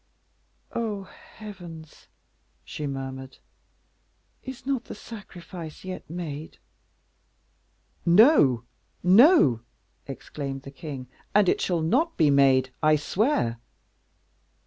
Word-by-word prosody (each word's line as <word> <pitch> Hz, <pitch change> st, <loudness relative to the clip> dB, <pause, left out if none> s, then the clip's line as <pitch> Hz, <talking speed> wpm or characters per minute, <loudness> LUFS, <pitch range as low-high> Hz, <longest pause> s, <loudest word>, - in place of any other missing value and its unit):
"Oh, 215 Hz, -4 st, -3 dB
heavens!" 175 Hz, -6 st, -12 dB, 0.6 s
she 150 Hz, -, -5 dB
murmured, 135 Hz, -1 st, -6 dB, 1.0 s
"is 260 Hz, -1 st, -9 dB
not 265 Hz, -3 st, -1 dB
the -, -, -8 dB
sacrifice 180 Hz, -7 st, -10 dB
yet 185 Hz, -4 st, -7 dB
made?" 160 Hz, -3 st, -6 dB, 1.5 s
"No, 170 Hz, -, +6 dB, 0.4 s
no!" 190 Hz, -, +6 dB, 0.5 s
exclaimed 135 Hz, 0 st, -6 dB
the 135 Hz, -, -9 dB
king, 135 Hz, -2 st, -7 dB, 0.3 s
"and 205 Hz, -2 st, +5 dB
it -, -, +2 dB
shall 170 Hz, -3 st, 0 dB
not 300 Hz, -, +1 dB
be 155 Hz, -4 st, +4 dB
made, 135 Hz, -2 st, +4 dB
I 155 Hz, 0 st, +5 dB
swear." 150 Hz, -, 0 dB
160 Hz, 95 wpm, -26 LUFS, 135-210 Hz, 1.5 s, No